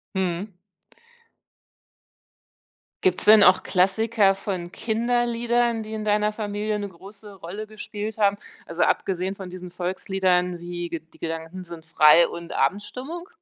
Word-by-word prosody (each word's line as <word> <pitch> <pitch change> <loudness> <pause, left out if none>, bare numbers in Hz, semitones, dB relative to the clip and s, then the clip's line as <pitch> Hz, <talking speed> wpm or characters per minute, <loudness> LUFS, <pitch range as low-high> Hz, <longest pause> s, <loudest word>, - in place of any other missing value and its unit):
Mhm. 190 +1 -2 2.5
Gibt's 185 -1 +2
denn 215 -1 +8
auch 185 +1 +6
Klassiker 200 +2 +3
von 185 -3 -5
Kinderliedern, 235 0 0
die 215 - -8
in 215 -1 -4
deiner 210 0 +2
Familie 210 0 -3
'ne 205 -1 -4
große 200 +3 -13
Rolle 195 +4 -7
gespielt 215 0 -6
haben? 205 -1 +3 0.3
Also, 170 +1 -4
abgesehen 190 0 0
von 190 -2 -8
diesen 180 0 -8
Volksliedern 180 0 0
wie, 175 0 -5
Ge 165 -2 -4
„Die - - -20
Gedanken 165 +3 -5
sind” 170 -2 -10
frei 160 +1 +6
und 170 0 -8
„Abendstimmung?” 265 - -2
195 Hz, 130 wpm, -24 LUFS, 180-215 Hz, 2.5 s, denn